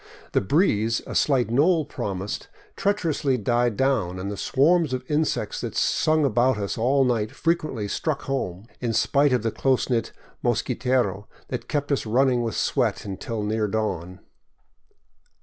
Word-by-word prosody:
The -, -, +2 dB
breeze 115 Hz, -, +2 dB
a -, -, -7 dB
slight 130 Hz, -5 st, +2 dB
knoll 155 Hz, +5 st, +3 dB
promised 100 Hz, -7 st, -4 dB, 0.3 s
treacherously 165 Hz, -9 st, 0 dB
died 120 Hz, 0 st, +1 dB
down, 115 Hz, -10 st, +1 dB
and 95 Hz, +2 st, -4 dB
the -, -, -4 dB
swarms 150 Hz, -, +2 dB
of 130 Hz, -, -2 dB
insects 155 Hz, +1 st, -1 dB
that -, -, -5 dB
sung 155 Hz, -1 st, +2 dB
about 125 Hz, -1 st, +2 dB
us 100 Hz, -1 st, -3 dB
all 135 Hz, +4 st, +2 dB
night 115 Hz, -4 st, 0 dB
frequently 155 Hz, -10 st, -1 dB
struck 145 Hz, +7 st, -2 dB
home, 110 Hz, -9 st, -3 dB
in 120 Hz, -2 st, -1 dB
spite 140 Hz, +4 st, +3 dB
of 125 Hz, -3 st, +1 dB
the 115 Hz, -, 0 dB
close 130 Hz, +1 st, 0 dB
knit 115 Hz, -2 st, 0 dB, 0.3 s
mosquitero 120 Hz, -4 st, 0 dB, 0.2 s
that 125 Hz, -, -5 dB
kept 145 Hz, -1 st, -1 dB
us 135 Hz, -5 st, 0 dB
running 125 Hz, +2 st, +3 dB
with 115 Hz, -5 st, -2 dB
sweat -, -, 0 dB
until 105 Hz, +2 st, -4 dB
near 105 Hz, +1 st, 0 dB
dawn. 95 Hz, -4 st, -3 dB
125 Hz, 150 wpm, -24 LUFS, 105-140 Hz, 0.3 s, knoll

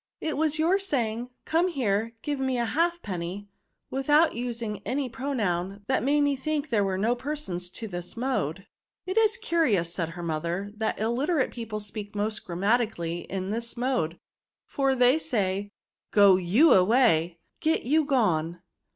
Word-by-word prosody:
" -, -, -67 dB
It 310 Hz, -, -2 dB
was 310 Hz, 0 st, +1 dB
your 340 Hz, +5 st, +3 dB
saying 245 Hz, -, -1 dB
* -, -, -51 dB
Come 335 Hz, +3 st, +2 dB
here, 230 Hz, -, 0 dB
give 290 Hz, -2 st, -2 dB
me 265 Hz, -1 st, 0 dB
a 240 Hz, -, +1 dB
halfpenny,* 205 Hz, -, -2 dB, 0.4 s
without 295 Hz, +5 st, +3 dB
using 230 Hz, -3 st, -4 dB
any 265 Hz, +2 st, -2 dB
pronoun, 205 Hz, -8 st, -2 dB
that 260 Hz, -, +1 dB
made 290 Hz, +3 st, +2 dB
me 285 Hz, -1 st, +2 dB
think 295 Hz, +1 st, -3 dB
there 210 Hz, -3 st, +3 dB
were 190 Hz, -1 st, -1 dB
no 220 Hz, +5 st, +2 dB
persons 245 Hz, -10 st, -4 dB
to 225 Hz, +4 st, -7 dB
this 175 Hz, +1 st, -7 dB
mode." 195 Hz, -, -2 dB, 0.2 s
" -, -, -66 dB
It 375 Hz, -, -3 dB
is 445 Hz, +1 st, +3 dB
curious," 260 Hz, -, +1 dB
said 165 Hz, -3 st, -2 dB
her 175 Hz, -, -5 dB
mother, 170 Hz, +5 st, -2 dB
" -, -, -22 dB
that 220 Hz, 0 st, -1 dB
illiterate 260 Hz, +7 st, +1 dB
people 225 Hz, -3 st, -5 dB
speak 205 Hz, 0 st, -7 dB
most 210 Hz, +1 st, -2 dB
grammatically 185 Hz, -2 st, 0 dB
in 190 Hz, 0 st, -3 dB
this 235 Hz, +2 st, -4 dB
mode; 235 Hz, -10 st, 0 dB, 0.5 s
for 270 Hz, -1 st, 0 dB
they 250 Hz, +4 st, +4 dB
say, 205 Hz, -9 st, -1 dB, 0.2 s
' -, -, -62 dB
Go 200 Hz, -2 st, +7 dB
y(m 190 Hz, -, +5 dB
away, 180 Hz, -5 st, +3 dB, 0.2 s
get 320 Hz, 0 st, +1 dB
y€u 310 Hz, +6 st, +3 dB
gone.' 175 Hz, -, +1 dB
230 Hz, 170 wpm, -27 LUFS, 190-280 Hz, 0.5 s, Go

